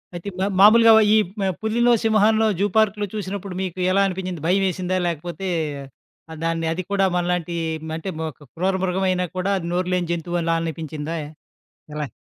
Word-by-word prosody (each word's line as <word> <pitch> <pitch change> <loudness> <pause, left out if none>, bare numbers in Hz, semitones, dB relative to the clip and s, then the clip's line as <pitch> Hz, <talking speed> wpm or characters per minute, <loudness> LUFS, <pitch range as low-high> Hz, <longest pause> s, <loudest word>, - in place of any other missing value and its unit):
అయితే 175 +3 -5
మా-మామూలుగా 205 +4 +6 0.2
ఈ - - +6 0.2
పు 195 - 0 0.2
పులినో, 235 +2 +2
సింహాన్నో 220 0 +3
జూ 200 - +3
పార్క్‌లో 210 -1 +2
చూసినప్పుడు 200 -2 -5
మీకు 185 -1 -4
ఎలా 195 +1 +3
అనిపించింది? 185 -3 -4
భయమేసిందా? 185 0 +1
లాకపోతే 175 +3 -4 1.0
దాన్ని 165 0 -1
అది 185 +3 -4
కూడా 195 -1 +3
మనలాంటి, 175 -1 -1 0.4
అంటే 165 +4 -5 0.3
క్రూర 165 +8 -2
మృగం 190 +1 0
అయినా 180 0 0
కూడా 185 +2 -1
అది 170 - -6
నోరులేని 180 -1 -1
జంతువులా 170 0 -1
అనిపిచ్చిందా? 160 -1 -5 0.8
ఎలా? 150 -1 -3
185 Hz, 140 wpm, -22 LUFS, 170-200 Hz, 1.0 s, మా-మామూలుగా